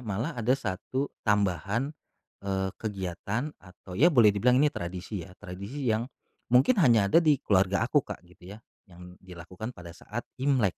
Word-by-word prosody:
malah 115 +7 -3
ada 125 +2 +1
1 130 +5 -3 0.2
tambahan, 105 - +1 0.5
eee, 95 -1 -2
kegiatan 105 - -3
atau 90 0 -14
ya 165 +6 +7
boleh 115 - +5
dibilang 125 +5 +3
ini 150 +1 +3
tradisi 90 +2 -5
ya, 95 - -16
tradisi 100 +9 -7
yang 115 +4 -1 0.4
mungkin 135 - +4
hanya 115 - +5
ada - - +6
di 155 -3 +4
keluarga 100 +1 +2
aku, 145 +4 +3
Kak, 105 - -9
gitu 90 +3 -13
ya - - -14 0.3
yang 90 0 -13
dilakukan 95 +5 -8
pada 85 -1 -10
saat 110 +7 -7 0.2
Imlek. 135 -5 +2
105 Hz, 160 wpm, -28 LUFS, 95-125 Hz, 0.5 s, ya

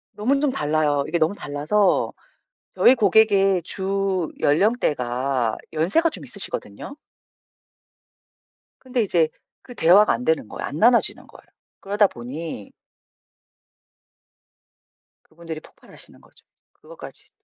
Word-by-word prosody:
너무 260 +7 +1
좀 290 -2 +1
달라요. 150 - 0
이게 170 +2 -1
너무 165 +5 +1
달라서 155 +8 0 0.6
저희 255 - +5
고객의 200 -4 +3
주 190 -1 -2
연령대가 135 - 0 0.2
연세가 195 - +1
좀 - - -6
있으시거든요. 280 - -5 1.9
근데 255 -2 -2
이제 165 -5 +2 0.3
그 245 - -13
대화가 190 +6 +5
안 250 - -4
되는 160 -9 0
거야. - - -6
안 145 - -6
나누어지는 235 +2 +2
거야. - - -17 0.4
그러다 205 +1 +2
보니 125 - -8 2.5
그분들이 160 -1 -9
폭발하시는 - - -18
거죠. - - -23 0.3
그것까지. - - -10
180 Hz, 255 characters per minute, -22 LUFS, 150-210 Hz, 2.5 s, 저희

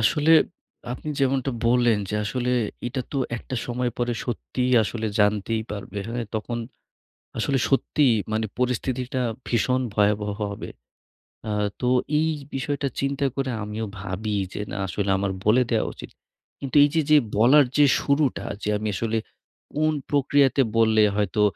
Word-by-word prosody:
আসলে 150 +7 +2 0.6
আপনি 150 - -7
যেমনটা 135 0 +1 0.2
বললেন 120 -3 +4
যে, - - -2
আসলে 125 +3 -1 0.4
এটা 130 +2 -2
তো 140 - 0 0.2
একটা 130 - -7
সময় 125 0 -1
পরে 120 0 0
সত্যিই 125 +1 -2
আসলে 110 +1 -3
জানতেই 105 +2 +2
পারবে। 100 0 -6
হ্যাঁ? 120 0 -3
তখন 115 +2 -3 0.8
আসলে 135 +4 +1
সত্যিই 135 -2 +3 0.2
মানে 110 0 0
পরিস্থিতিটা 125 +1 -1 0.2
ভীষণ 125 +2 +1
ভয়াবহ 105 0 +2 0.2
হবে। 100 - -7 0.8
আ - - -1 0.3
তো 125 - 0 0.3
এই 160 +1 +2 0.2
বিষয়টা 140 +1 -2
চিন্তা 140 0 0
করে 135 -1 -1
আমিও 105 +2 -4
ভাবি 100 +2 -3 0.2
যে, - - -4
না - - -5
আসলে 100 +2 -2
আমার 100 0 -1
বলে 115 +5 +5
দেয়া 110 - +2
উচিত। - - -10 0.5
কিন্তু 135 0 -6
এই 145 - +4
যে, 160 - +4
যে 150 - +8 0.2
বলার 135 +6 +6
যে 145 - +7
শুরুটা, 140 -1 +1 0.2
যে - - -2
আমি 110 +1 -3
আসলে 115 +3 -1 0.6
কোন 155 +1 +1 0.2
প্রক্রিয়াতে 140 -1 +3 0.2
বললে 110 -1 +5
হয়তো 105 +1 0
120 Hz, 150 wpm, -24 LUFS, 110-135 Hz, 0.8 s, যে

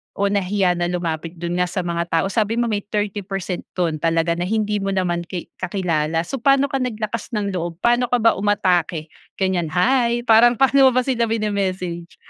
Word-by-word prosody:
o 200 0 0
nahiya 190 -2 +1
na 175 - 0
lumapit 170 -1 -3
do'n 175 +1 -3
nga 180 - +2
sa 180 +1 -3
mga 170 0 -2
tao? 165 0 +1
Sabi 220 0 0
mo 235 -1 0
may 205 - 0
30 205 -1 -2
percent 195 -2 -5
do'n 165 -4 -1
talaga 165 +1 +1
na 175 +1 -1
hindi 210 0 0
mo 195 - -3
naman 175 -2 -1
ki 180 -2 -7
kakilala. 165 -4 -1
So, 270 +10 -5
paano 275 +3 +3
ka 270 - 0
naglakas 230 -1 -4
ng 205 -1 -1
loob 175 -2 -3
paano 240 +1 +3
ka 245 - +1
ba 230 - +6
umatake 180 -6 0 0.2
ganyan? 185 -3 0
"Hi," 240 +4 +2
parang 240 +1 +5
paano 270 +2 +5
mo - - +4
ba 255 - +3
sila 240 -3 0
mine-message? 190 -6 -2
195 Hz, 195 wpm, -21 LUFS, 175-225 Hz, 0.2 s, ba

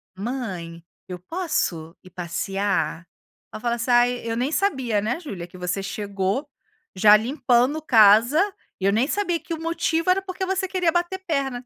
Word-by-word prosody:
"Mãe, 190 -7 -5 0.2
eu 180 -1 -6
posso 180 - -2
ir 185 - -15
passear?" 175 -1 -2 0.4
Ai - - -6
eu - - -13
falo 235 0 0
assim: 240 +2 -2
"Ai, 245 0 +4
eu 230 0 -3
nem 260 +5 -1
sabia, 265 - 0
né, 240 +9 -2
Julia, 195 - -7
que 185 - -14
você 180 +2 -2
chegou 200 +5 -3 0.5
já 210 +2 +7
limpando 255 +4 +1
casa, 225 +2 +5 0.4
e 190 - -2
eu 200 - +4
nem 235 +5 +2
sabia 355 -1 -1
que 325 +2 -6
o 320 - -6
motivo 330 +1 0
era 375 +1 +3
porque 375 0 -4
você 380 0 -1
queria 360 -3 +1
bater 350 +3 -1
perna". 270 -6 -1
240 Hz, 175 wpm, -23 LUFS, 195-320 Hz, 0.5 s, já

